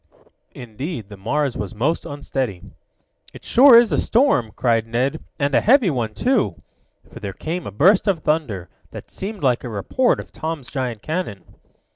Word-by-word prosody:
Indeed 120 Hz, -, -6 dB
the 105 Hz, -, -9 dB
Mars 140 Hz, +7 st, -1 dB
was 105 Hz, +3 st, -5 dB
most 145 Hz, +10 st, -1 dB
unsteady. 135 Hz, -9 st, -4 dB, 0.7 s
"It -, -, -12 dB
sure 255 Hz, -1 st, +7 dB
is 235 Hz, -1 st, +5 dB
a -, -, +1 dB
storm!" 225 Hz, -, +2 dB
cried 115 Hz, -2 st, +1 dB
Ned, 130 Hz, +7 st, -1 dB
"and 140 Hz, 0 st, -1 dB
a -, -, +4 dB
heavy 240 Hz, -, +4 dB
one, 115 Hz, -5 st, -3 dB
too," 250 Hz, -4 st, 0 dB, 0.5 s
for -, -, -9 dB
there 100 Hz, -2 st, -5 dB
came 165 Hz, -, -5 dB
a -, -, -6 dB
burst 180 Hz, -, +4 dB
of 180 Hz, -6 st, 0 dB
thunder, 120 Hz, -, -1 dB, 0.2 s
that -, -, -11 dB
seemed 200 Hz, -3 st, -6 dB
like 125 Hz, -3 st, +2 dB
a 125 Hz, -, -5 dB
report 115 Hz, -, 0 dB
of -, -, -9 dB
Tom's 160 Hz, -5 st, -5 dB
giant 125 Hz, -6 st, -4 dB
cannon. 155 Hz, -, -4 dB
140 Hz, 170 wpm, -21 LUFS, 115-180 Hz, 0.7 s, sure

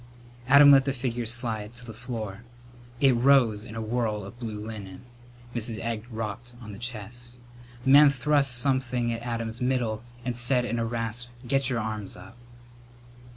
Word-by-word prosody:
Adam 140 Hz, +2 st, +8 dB
let 135 Hz, -1 st, +7 dB
the 135 Hz, -, 0 dB
figure 120 Hz, -2 st, -3 dB
slide 115 Hz, -2 st, -1 dB
to 120 Hz, +1 st, -4 dB
the 115 Hz, -, -8 dB
floor. 110 Hz, -3 st, -6 dB, 0.6 s
It 135 Hz, -2 st, +5 dB
rose 120 Hz, -4 st, +4 dB
in 115 Hz, -1 st, -9 dB
a 115 Hz, -, -3 dB
whirl 110 Hz, -2 st, -1 dB
of 120 Hz, +5 st, -11 dB
blue 110 Hz, -3 st, -5 dB
linen. 105 Hz, -3 st, -8 dB, 0.5 s
Mrs. 115 Hz, -1 st, -2 dB
Egg 115 Hz, -1 st, -3 dB
rocked 115 Hz, +1 st, -6 dB
on 110 Hz, -4 st, -9 dB
the 100 Hz, -, -10 dB
chest. 120 Hz, +1 st, -5 dB, 0.5 s
The 135 Hz, -, +2 dB
man 145 Hz, +1 st, +9 dB
thrust 140 Hz, -2 st, +2 dB
something 125 Hz, -2 st, 0 dB
at 115 Hz, -, -5 dB
Adam's 115 Hz, -1 st, -4 dB
middle 125 Hz, -4 st, 0 dB, 0.2 s
and 125 Hz, -1 st, -2 dB
said 120 Hz, +1 st, +2 dB
in 120 Hz, -1 st, -2 dB
a 115 Hz, -, 0 dB
rasp, 115 Hz, +1 st, -3 dB, 0.2 s
"Get 135 Hz, +1 st, +2 dB
your 125 Hz, -, 0 dB
arms 110 Hz, -3 st, -4 dB
up!" -, -, -13 dB
120 Hz, 170 wpm, -27 LUFS, 110-125 Hz, 0.6 s, man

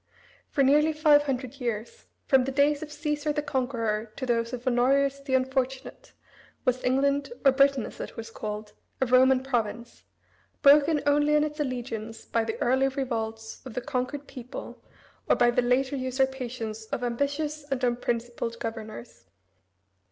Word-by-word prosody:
For 275 Hz, -, +2 dB
nearly 300 Hz, +4 st, +4 dB
five 300 Hz, -1 st, +5 dB
hundred 265 Hz, -1 st, -3 dB
years, 235 Hz, -, -4 dB, 0.2 s
from 265 Hz, -2 st, +4 dB
the 270 Hz, -, -2 dB
days 285 Hz, +1 st, +2 dB
of 310 Hz, -1 st, -7 dB
Caesar 300 Hz, 0 st, -2 dB
the 295 Hz, 0 st, -2 dB
conqueror, 235 Hz, -6 st, -1 dB
to 260 Hz, -, -4 dB
those 230 Hz, -2 st, 0 dB
of 250 Hz, -1 st, -6 dB
Honorius 270 Hz, +3 st, +2 dB
the 275 Hz, -1 st, -1 dB
unfortunate, 265 Hz, 0 st, -2 dB, 0.5 s
was 255 Hz, -1 st, +1 dB
England, 280 Hz, -, +1 dB
or 270 Hz, -, +8 dB
Britain 275 Hz, -1 st, +3 dB
as -, -, -10 dB
it -, -, -7 dB
was 225 Hz, 0 st, -7 dB
called, 210 Hz, -1 st, -6 dB, 0.3 s
a 265 Hz, -, +2 dB
Roman 255 Hz, +1 st, +5 dB
province, 235 Hz, -2 st, -3 dB, 0.6 s
broken 290 Hz, +2 st, +6 dB
only 295 Hz, +1 st, +3 dB
in 300 Hz, -, +4 dB
its 300 Hz, 0 st, -4 dB
allegiance 230 Hz, -5 st, -4 dB
by 230 Hz, -, 0 dB
the 225 Hz, 0 st, -4 dB
early 265 Hz, +2 st, +3 dB
revolts 225 Hz, -5 st, -4 dB
of 255 Hz, -4 st, -9 dB
the 250 Hz, -, -1 dB
conquered 255 Hz, +4 st, -3 dB
people 250 Hz, -1 st, -9 dB, 0.5 s
or -, -, +6 dB
by 240 Hz, 0 st, +4 dB
the 245 Hz, -, +2 dB
later 255 Hz, +3 st, +1 dB
usurpations 255 Hz, -4 st, -2 dB
of 240 Hz, -, -4 dB
ambitious 285 Hz, +5 st, -2 dB
and 270 Hz, -1 st, -2 dB
unprincipled 240 Hz, -1 st, -1 dB
governors. 220 Hz, -, -7 dB
260 Hz, 155 wpm, -27 LUFS, 235-280 Hz, 0.6 s, or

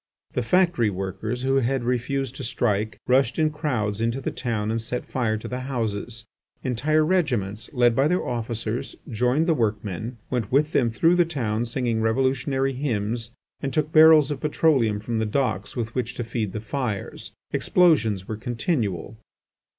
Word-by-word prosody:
The 125 Hz, -, 0 dB
factory 175 Hz, -, +3 dB
workers, 95 Hz, +6 st, -4 dB
who 135 Hz, +1 st, +2 dB
had 135 Hz, 0 st, +1 dB
refused 125 Hz, +2 st, -1 dB
to -, -, -6 dB
strike, 110 Hz, -3 st, -1 dB
rushed 130 Hz, 0 st, +3 dB
in 155 Hz, -1 st, +2 dB
crowds 120 Hz, -9 st, -2 dB
into 115 Hz, +3 st, 0 dB
the -, -, -3 dB
town 110 Hz, -4 st, -2 dB
and 115 Hz, 0 st, -1 dB
set 125 Hz, +2 st, -4 dB
fire 115 Hz, -4 st, -1 dB
to 110 Hz, -, -7 dB
the 125 Hz, -, -4 dB
houses. 115 Hz, -3 st, -3 dB, 0.4 s
Entire 155 Hz, +5 st, +2 dB
regiments, 125 Hz, -, 0 dB
led 120 Hz, -3 st, +3 dB
by 135 Hz, +4 st, +3 dB
their 180 Hz, +3 st, 0 dB
officers, 115 Hz, -1 st, -3 dB, 0.2 s
joined 125 Hz, +7 st, +2 dB
the 165 Hz, -, +3 dB
workmen, 110 Hz, -, -2 dB
went 120 Hz, -5 st, -1 dB
with 150 Hz, +4 st, +3 dB
them 120 Hz, -7 st, +2 dB
through 165 Hz, +10 st, +3 dB
the 175 Hz, -, +6 dB
town 120 Hz, -9 st, -2 dB
singing 120 Hz, -2 st, -1 dB
revolutionary 130 Hz, +3 st, +1 dB
hymns, 115 Hz, -4 st, -2 dB, 0.3 s
and 135 Hz, -, -2 dB
took 155 Hz, 0 st, 0 dB
barrels 155 Hz, -2 st, +7 dB
of 145 Hz, -, -3 dB
petroleum 140 Hz, -8 st, +2 dB
from 110 Hz, +1 st, -2 dB
the 110 Hz, -, +1 dB
docks 110 Hz, -4 st, -1 dB
with 115 Hz, -2 st, -3 dB
which 125 Hz, -1 st, -2 dB
to 120 Hz, -, -3 dB
feed 110 Hz, -3 st, -3 dB
the 110 Hz, -, -4 dB
fires. 110 Hz, -3 st, -4 dB, 0.2 s
Explosions 120 Hz, -, +3 dB
were 110 Hz, -, -4 dB
continual. 115 Hz, -, -2 dB
120 Hz, 165 wpm, -24 LUFS, 110-135 Hz, 0.4 s, barrels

